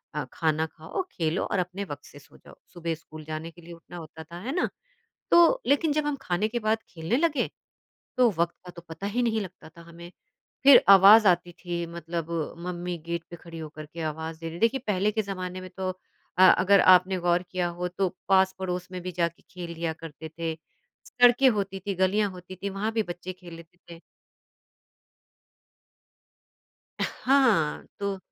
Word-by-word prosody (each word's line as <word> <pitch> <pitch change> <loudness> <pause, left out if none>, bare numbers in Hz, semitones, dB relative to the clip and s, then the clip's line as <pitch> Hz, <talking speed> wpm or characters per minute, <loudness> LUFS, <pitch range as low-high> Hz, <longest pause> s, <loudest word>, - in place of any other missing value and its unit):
अ, 150 -2 -2
खाना 160 -1 +1
खाओ, 160 - -5
खेलो 165 +1 -1
और 200 - -1
अपने 180 +2 -3
वक़्त 145 -5 -8
से 145 - -14
सो 145 +1 -19
जाओ, - - -17 0.2
सुबह 170 -1 -3
स्कूल 155 -1 -12
जाने 155 +2 -5
के 175 - -17
लिए 170 +1 -11
उठना 170 +1 -12
होता 160 -1 -9
था, 170 +2 -10
है 240 +8 -4
ना? 365 - +1 0.6
तो 345 +9 +6
लेकिन 290 +2 +3
जब 305 0 0
हम 295 -1 0
खाने 180 +1 0
के 240 +2 -3
बाद 215 0 +1
खेलने 165 +7 -1
लगे 295 -4 +1 0.7
तो 250 -2 +5
वक़्त 170 0 0
का 180 - -9
तो 170 - -9
पता 165 +5 -5
ही 230 +5 -1
नहीं 225 -2 +1
लगता 185 -4 -10
था 170 +1 -15
हमें, 170 +1 -12 0.5
फिर 275 -1 +9
आवाज़ 200 +2 +9
आती 175 0 +2
थी 170 -1 -4
मतलब 170 0 -5 0.4
मम्मी 175 0 -4
गेट 170 0 -3
पे 170 - -8
खड़ी 165 -1 -10
होकर 155 -1 -8
के 165 +2 -9
आवाज़ 160 +1 -4
दे 165 - -9
रही 165 - -7
हैं। - - -8
देखिए 230 +4 +3
पहले 205 +1 +1
के 220 - 0
ज़माने 185 -2 -5
में 185 - -9
तो 190 -1 -2 0.5
अ, 185 - +6
अगर 195 +2 +5
आपने 185 +1 +5
गौर 175 0 +1
किया 180 -1 0
हो 180 +1 -2
तो 185 +2 -1 0.2
पास-पड़ोस 190 -1 +1
में 185 - -5
भी 185 +1 -5
जाके 170 -1 -2
खेल 175 -2 -7
लिया 165 0 -2
करते 160 -1 -10
थे, 165 0 -4 0.5
सड़कें 245 +2 +5
होती 195 -4 -2
थीं 195 -3 -2
गलियाँ 200 +2 +2
होती 180 0 -10
थीं 200 +2 -4
वहाँ 200 +3 -2
भी 220 -1 +1
बच्चे 175 0 -7
खेल 175 -1 -13
लेते 165 +1 -15
थे। 165 - -11 3.0
हाँ 250 - +2 0.2
तो 200 -1 -2
180 Hz, 190 wpm, -27 LUFS, 165-200 Hz, 3.0 s, फिर